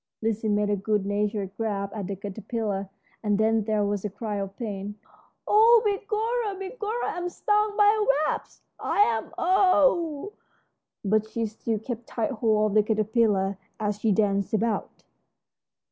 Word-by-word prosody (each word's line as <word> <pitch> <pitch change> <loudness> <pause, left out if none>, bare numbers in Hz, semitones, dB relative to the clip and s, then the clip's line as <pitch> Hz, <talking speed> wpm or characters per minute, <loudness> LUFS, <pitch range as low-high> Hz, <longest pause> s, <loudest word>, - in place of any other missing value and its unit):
Lizzie 220 0 0
made 205 0 +1
a - - +3
good 205 0 0
natured 205 -1 -1
grab 200 -3 -2
at 205 -4 -4
the 200 - -3
caterpillar, 200 0 -4 0.3
and 210 -2 +1
then 220 0 +2
there 215 -1 +1
was 205 -1 -2
a 210 - -2
cry 210 +1 -4
of 195 0 -5
pain. 205 -3 -5 0.5
"Oh, 450 +2 +6
begorra, 425 +1 -1
begorra, 425 +4 -3
I'm 355 0 -3
stung 420 +3 0
by 415 - +6
a 305 -6 +2
wasp, - - -7 0.2
I - - -2
am! 225 - +2
Ow!" 345 -2 +2 0.7
But 215 +2 +2
she 230 0 -2
still 220 +1 -3
kept 230 +2 -6
tight 230 +1 -2
hold 215 -3 +2
of - - -4
the - - +7
caterpillar 210 -2 +1 0.2
as 210 -1 -1
she 220 0 +2
danced 200 0 +1
about. 220 0 -2
220 Hz, 155 wpm, -26 LUFS, 205-310 Hz, 0.7 s, the